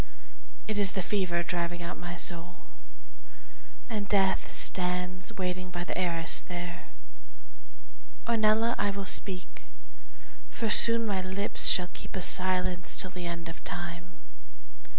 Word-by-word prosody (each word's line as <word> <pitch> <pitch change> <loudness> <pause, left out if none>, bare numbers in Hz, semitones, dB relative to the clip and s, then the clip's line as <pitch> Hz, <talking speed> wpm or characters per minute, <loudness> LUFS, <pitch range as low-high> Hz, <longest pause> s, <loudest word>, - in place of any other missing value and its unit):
It 215 -1 -1
is 200 -1 +4
the 190 - -1
fever 175 -3 +1
driving 175 0 -2
out 170 - -4
my 175 0 -6
soul, 175 +1 -1 1.3
And 210 -4 -3
Death 195 -2 +2
stands 180 0 0
waiting 185 -1 -2
by 175 -1 -4
the - - -4
arras 170 -2 +2
there. 175 -1 -6 1.4
Ornella, 225 0 +4
I 205 - +2
will 200 0 -3
speak, 190 -1 -2 0.8
for 225 -2 -2
soon 230 +1 +5
my 200 -3 0
lips 190 +2 -1
Shall 180 -1 +3
keep - - -8
a 190 - -2
silence 185 -1 +3
till 185 - +3
the 180 -1 -5
end 170 -1 -4
of 165 - -9
time. 175 0 -5
180 Hz, 130 wpm, -30 LUFS, 175-200 Hz, 1.4 s, soon